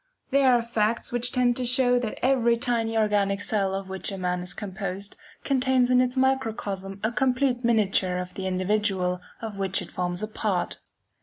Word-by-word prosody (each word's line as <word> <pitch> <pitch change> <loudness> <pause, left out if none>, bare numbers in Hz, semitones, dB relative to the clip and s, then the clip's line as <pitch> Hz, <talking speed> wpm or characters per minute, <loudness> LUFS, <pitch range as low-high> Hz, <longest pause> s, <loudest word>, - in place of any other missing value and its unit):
There 270 -1 +5
are 240 -1 +3
facts 230 +1 -1
which 245 0 -1
tend 245 -1 +2
to 255 - -2
show 245 0 +3
that 230 -3 -4
every 240 -3 +3
tiny 230 -2 0
organic 205 -2 +2
cell 200 -2 0
of 195 0 -4
which 190 +1 -3
a 195 - -5
man 180 -1 -1
is 180 - -5
composed, 195 -1 -5 0.3
contains 260 -2 +2
in 250 0 +5
its 255 +1 -1
microcosm 220 -7 -1
a 220 - +1
complete 255 +1 +1
miniature 200 -5 +2
of 180 0 -5
the 190 -1 -4
individual 185 -1 0 0.2
of 210 -3 -5
which 195 -1 +2
it - - -8
forms 180 +1 -2
a - - -1
part. 210 -4 -2
215 Hz, 180 wpm, -26 LUFS, 195-245 Hz, 0.3 s, There